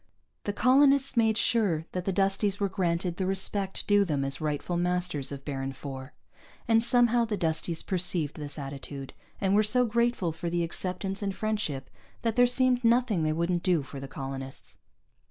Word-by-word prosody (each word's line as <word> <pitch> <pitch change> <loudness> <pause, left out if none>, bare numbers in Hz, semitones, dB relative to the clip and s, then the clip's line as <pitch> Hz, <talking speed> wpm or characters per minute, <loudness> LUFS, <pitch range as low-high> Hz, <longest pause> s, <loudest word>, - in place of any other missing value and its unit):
The 205 - 0
colonists 270 +4 +4
made 225 -2 +3
sure 195 -12 +2
that 180 -1 -4
the 195 - +1
Dusties 195 +1 0
were 200 - +1
granted 175 -1 -1
the 185 - -1
respect 195 0 0
due 205 -1 +4
them 145 -7 -1
as 135 +2 +2
rightful 155 +3 -2
masters 175 -5 -1
of 140 -1 -8
Baron 135 -2 -3
IV. 135 0 -7 0.6
And 225 -1 +4
somehow 240 0 +3
the 220 -2 -2
Dusties 165 -1 -1
perceived 175 -5 0
this 145 -1 -6
attitude, 140 -1 -7 0.3
and 195 -1 +1
were 210 - +5
so 245 +4 +3
grateful 235 -6 +1
for 165 +2 -4
the 170 0 0
acceptance 185 +3 -3
and 195 -2 -2
friendship 210 -12 -2 0.4
that 230 -2 0
there 245 0 +5
seemed 250 0 +2
nothing 230 -5 +3
they 155 0 +1
wouldn't 170 +2 0
do 175 -6 +1
for 135 +1 -9
the 135 - -7
colonists. 135 0 -7
185 Hz, 175 wpm, -28 LUFS, 155-215 Hz, 0.6 s, were